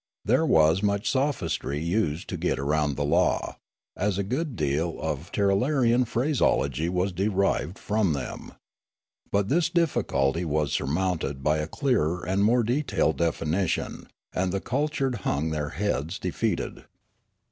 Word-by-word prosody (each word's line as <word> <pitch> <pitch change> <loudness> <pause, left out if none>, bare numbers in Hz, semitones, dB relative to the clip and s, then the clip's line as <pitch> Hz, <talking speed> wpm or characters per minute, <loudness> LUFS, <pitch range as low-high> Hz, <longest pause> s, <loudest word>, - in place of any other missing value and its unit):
There - - +3
was 80 +4 +4
much 100 -1 0
sophistry 130 - -1
used 85 -1 -1
to - - -3
get - - 0
round 75 +1 0
the 70 - 0
law, 85 +5 +1 0.4
as 100 -1 0
a 100 - 0
good 130 - -2
deal 75 +2 -1
of 80 +3 -4
Tirralarian 120 +5 +2
phraseology 120 - +1
was 90 +2 0
derived 95 -2 0
from 105 -5 +1
them. 70 -3 -6 0.8
But 100 0 +1
this 170 +3 +2
difficulty 90 - +1
was 75 -2 0
surmounted 80 -3 -1
by 75 +1 +2
a 75 - -2
clearer 90 - 0
and 95 +2 +1
more 120 +3 +4
detailed 105 - +1
definition, 85 +2 -1 0.3
and 90 0 0
the 100 - -1
cultured 135 +1 -1
hung 75 +3 -1
their 75 -1 -2
heads 85 -3 -2
defeated. - - -2
90 Hz, 135 wpm, -26 LUFS, 80-110 Hz, 0.8 s, was